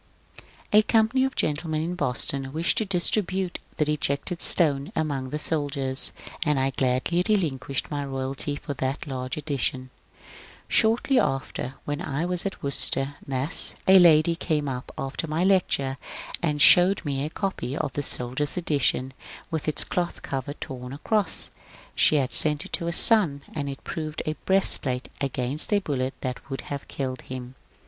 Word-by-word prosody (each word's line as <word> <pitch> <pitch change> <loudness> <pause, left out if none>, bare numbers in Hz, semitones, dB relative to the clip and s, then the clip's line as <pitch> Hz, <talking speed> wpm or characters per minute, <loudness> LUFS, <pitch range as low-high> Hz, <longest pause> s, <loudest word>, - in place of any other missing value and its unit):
A 210 - +8
company 225 +4 +2
of 265 - -4
gentlemen 155 +1 -1
in 170 +2 -3
Boston 135 -3 -1
wished 160 +4 +1
to 220 - -1
distribute 190 0 +1
'^ - - -33
The 150 - +1
Rejected 150 +3 -1
Stone 145 -5 +4
" - - -31
among 140 -4 -2
the 150 - -3
soldiers, 140 -4 -2 0.3
and 150 -4 +1
I 135 +1 +1
gladly 130 +7 0
re 215 - +5
linquished 140 -6 -3
my 145 -1 -2
royalty 135 +1 -3
for 145 - -6
that 135 +2 -3
large 130 -2 -5
edition. 135 -3 -2 0.8
Shortly 235 +4 +2
after, 135 -1 -2
when 145 0 -3
I 145 +4 -3
was 180 +1 -1
at 195 - -8
Worcester, 140 0 +4
Mass., 135 +4 +4
a 190 0 +8
lady 165 -1 +5
came 155 -4 -2
up 125 -2 -5
after 135 +4 -4
my 155 +3 -1
lecture 165 -8 +1 0.4
and 150 -3 -1
showed 180 +5 +6
me 140 -1 -2
a 150 - -3
copy 165 -7 -4
of - - -3
the 145 - -2
soldiers' 135 +4 -3
edition 140 -5 0 0.4
with 160 -2 -3
its 155 - 0
cloth 175 -1 -3
cover 135 +1 -4
torn 130 -4 -8
across; 195 +5 -1 0.4
she - - +4
had 135 -3 +1
sent 150 -1 +5
it - - -13
to 170 - -2
her - - 0
son, 170 -7 +5
and 145 -2 -3
ii 135 - -6
proved 155 -1 -5
a 155 - -1
breastplate 140 -9 +2
against 135 - -1
a 205 - +4
bullet 135 -9 -2
that 125 -1 -6
would 135 - -4
have 140 -1 -5
killed 130 -2 -5
him. 125 -1 -8
145 Hz, 170 wpm, -25 LUFS, 135-170 Hz, 0.8 s, A